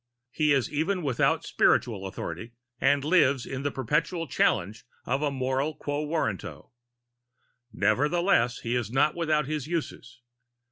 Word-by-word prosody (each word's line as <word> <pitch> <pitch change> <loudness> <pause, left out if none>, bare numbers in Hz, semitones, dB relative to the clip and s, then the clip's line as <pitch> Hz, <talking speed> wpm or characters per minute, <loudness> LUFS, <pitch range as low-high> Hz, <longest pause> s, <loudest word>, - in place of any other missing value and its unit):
He 150 +1 +1
is 135 -1 +1
even 175 +5 0
without 135 -5 +1
scriptural 100 -6 +1
authority, 95 +4 -6 0.3
and 140 0 +3
lives 140 -5 +3
in 135 0 -5
the 145 - -1
perpetual 150 +6 -1
challenge 110 -4 0 0.2
of 135 +4 -1
a 150 - +1
moral 135 +2 -1
quo 145 +1 -3
warranto. 100 - -3 1.0
Nevertheless 125 - +2
he 120 +1 -2
is 120 -4 -1
not 135 +5 +2
without 155 -3 0
his 150 -1 -3
uses. 125 -7 -5
140 Hz, 135 wpm, -27 LUFS, 120-155 Hz, 1.0 s, and